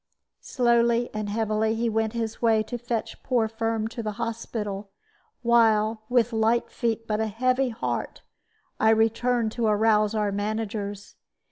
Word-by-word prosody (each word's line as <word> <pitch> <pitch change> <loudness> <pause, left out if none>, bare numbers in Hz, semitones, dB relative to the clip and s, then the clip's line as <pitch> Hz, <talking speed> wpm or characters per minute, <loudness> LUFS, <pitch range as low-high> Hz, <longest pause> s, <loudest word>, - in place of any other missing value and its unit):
Slowly 235 -1 +2
and 215 -1 -3
heavily 220 +1 0
he 235 +1 0
went 220 0 0
his 225 -2 -4
way 225 -2 +3
to 240 +2 -6
fetch 235 -1 -4
poor 240 -4 +1
Firm 225 0 -2
to 230 - -6
the 215 -1 -3
hospital; 210 -3 -4 0.5
while, 225 -2 +3
with 245 -1 +2
light 225 +2 +1
feet 230 -1 -2
but 215 -1 -1
a 220 - 0
heavy 255 +4 +1
heart, 225 - -4 0.6
I 220 - +4
returned 225 +1 +2
to 230 0 -1
arouse 215 0 +3
our 210 -1 0
managers. 205 0 -4
225 Hz, 145 wpm, -25 LUFS, 215-235 Hz, 0.6 s, I